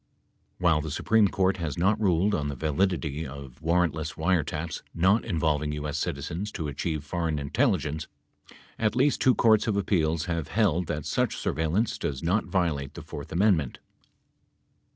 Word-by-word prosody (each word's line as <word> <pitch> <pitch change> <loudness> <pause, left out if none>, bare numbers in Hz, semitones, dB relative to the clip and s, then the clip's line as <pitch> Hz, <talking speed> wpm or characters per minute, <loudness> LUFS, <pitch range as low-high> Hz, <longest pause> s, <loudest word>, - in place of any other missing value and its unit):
While 85 -4 +3
the 80 - -5
Supreme 105 +8 +3
Court 95 0 +1
has 85 -1 -3
not 100 +5 +2
ruled 95 +1 +2
on 75 -6 0
the 70 - -4
validity 80 +1 -1
of 70 0 -10
warrant 85 0 +2
less 80 +1 -4
wiretaps 80 -1 -1
not 95 +6 +3
involving 75 -3 0
U.S. 75 -1 -3
citizens 100 +7 -3
to 80 -6 -3
achieve 75 +2 -3
foreign 80 +1 -2
intelligence, 80 - 0 0.7
at 110 0 +1
least 135 +3 +2
two 130 - +5
courts 110 -2 +4
of 105 -2 +1
appeals 85 -5 +1
have 85 -4 -2
held 90 -6 +1
that 75 -1 -3
such - - 0
surveillance 80 - 0
does 70 0 -3
not 95 +6 +1
violate 80 -8 -1
the - - -8
fourth 70 - -8
amendment. 85 -6 +2
85 Hz, 155 wpm, -27 LUFS, 75-95 Hz, 0.7 s, two